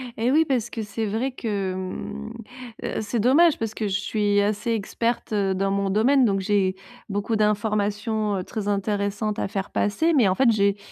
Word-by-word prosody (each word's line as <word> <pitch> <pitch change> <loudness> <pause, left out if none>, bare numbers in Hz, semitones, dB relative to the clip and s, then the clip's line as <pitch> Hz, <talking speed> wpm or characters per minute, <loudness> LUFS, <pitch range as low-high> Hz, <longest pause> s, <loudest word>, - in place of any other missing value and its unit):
Et 235 +3 +1
oui, 315 +3 +4
parce 245 -5 0
que 225 - -4
c'est 220 +1 -3
vrai 225 +6 -1
que, 205 -6 -3
mmh 210 +4 -6 0.5
heu, - - -2
c'est 220 +2 -2
dommage 290 +8 +5
parce 225 -1 -3
que 215 - -2
je 195 0 0
suis 205 -2 +1
assez 210 +3 -1
experte, 230 +2 -2
heu, 195 -2 +1
dans 195 +1 0
mon 200 0 0
domaine, 250 +7 +4
donc 195 -3 +1
j'ai 190 -1 +1 0.3
beaucoup 205 +3 -1
d'informations, 210 0 0
heu, 185 - -3
très 210 +1 -5
intéressantes 205 +1 -1
à - - -1
faire 195 0 -4
passer. 320 +12 +1
Mais, 255 -9 +4
en 185 - +2
fait, 260 +1 +4
j'ai 200 -2 +2
210 Hz, 190 wpm, -24 LUFS, 200-225 Hz, 0.5 s, dommage